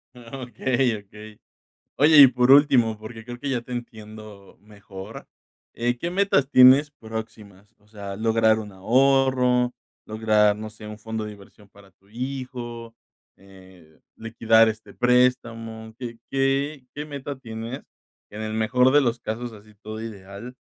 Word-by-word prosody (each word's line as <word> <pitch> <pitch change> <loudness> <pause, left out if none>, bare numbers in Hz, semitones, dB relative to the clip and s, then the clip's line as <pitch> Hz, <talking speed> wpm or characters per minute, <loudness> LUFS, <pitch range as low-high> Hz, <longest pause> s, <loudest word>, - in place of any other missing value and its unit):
Okey, 125 0 -2
okey. 105 +1 -14 0.6
Oye, 150 +2 +5
y - - +11
por 125 0 +1
último, 130 -6 +5
porque 110 +1 -10
creo 120 +1 -8
que 140 +2 -4
ya 125 -2 -1
te 120 +1 -11
entiendo 110 -4 -10
mejor. 100 0 -11 0.5
Eh, 120 +1 -1
¿qué 170 - -3
metas 185 -8 +1
tienes 130 +3 +7
próximas? 110 -4 -10
O 105 - -30
sea, 100 -2 -8
lograr 110 0 +2
un 105 -2 -8
ahorro, 125 +3 +2 0.3
lograr, 110 -1 +2
no 110 0 -7
sé, 110 0 -13
un 105 0 -9
fondo 110 0 -5
de 105 - -7
inversión 100 +1 -17
para 100 -1 -19
tu 95 +3 -32
hijo, 120 -1 -7 0.4
eh, 95 -5 -19 0.2
liquidar 115 0 +3
este 110 -2 -7
préstamo, 120 -3 0
¿qué, 120 -3 -7
qué, 135 +1 -1
qué 150 - -5
meta 140 -1 -7
tienes 115 +1 -7 0.5
que 105 - -11
en 110 - -5
el 110 0 -4
mejor 125 +4 +2
de 145 - +6
los 120 -2 0
casos, 115 +2 -5
así 105 0 -16
todo 110 +1 -7
ideal, 105 +3 -9
115 Hz, 150 wpm, -23 LUFS, 105-125 Hz, 0.6 s, y